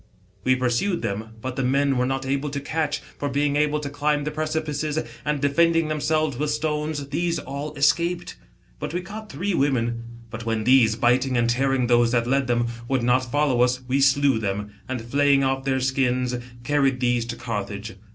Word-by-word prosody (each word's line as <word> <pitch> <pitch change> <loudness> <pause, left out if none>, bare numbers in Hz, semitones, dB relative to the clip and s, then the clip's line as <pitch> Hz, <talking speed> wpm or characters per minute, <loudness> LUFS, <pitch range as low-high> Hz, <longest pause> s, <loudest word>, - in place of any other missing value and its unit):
We 130 +2 +3
pursued 130 +9 0
them; 110 +3 -4
but 130 +1 -4
the 135 - 0
men 140 +2 +2
we 135 - 0
were 125 - +2
not 135 0 -2
able 140 +2 -1
to 140 0 -3
catch, 150 +1 -2 0.2
for 145 - -1
being 145 +1 +1
able 150 0 +2
to 145 - -4
climb 145 0 0
the 150 - -2
precipices, 155 -1 -2 0.3
and 150 -1 -1
defending 165 +3 +3
themselves 155 -2 0
with 150 +2 -1
"stones, 150 -1 -2
these 170 +3 0
all 145 +2 -6
escaped. 170 +5 +1 0.4
But 150 +2 -4
we 180 - 0
caught 215 +4 -8
three 200 +2 -2
wo^ien. 120 -6 +1 0.3
But" 115 +1 -6
when 115 -1 -1
these, 120 -3 +5
biting 125 +2 +2
and 120 0 +2
tear 130 +3 +1
ing 130 -2 +1
tKose 120 -1 +4
that 120 -1 +2
led 135 +1 +1
them, 120 -1 +1 0.2
would 130 -2 0
not 125 0 +2
follow 145 -4 +2
us, 125 +1 +2
We 135 +2 +1
slew 135 -2 +4
them, 105 0 -3 0.2
and 125 -3 -3
flaying 140 +2 +3
off 135 0 0
their 130 -1 +1
skins, 125 -1 0 0.3
carried 135 -1 +2
these 120 -1 +1
to 120 0 -5
Carthage. 105 -2 -5
135 Hz, 195 wpm, -24 LUFS, 125-150 Hz, 0.4 s, these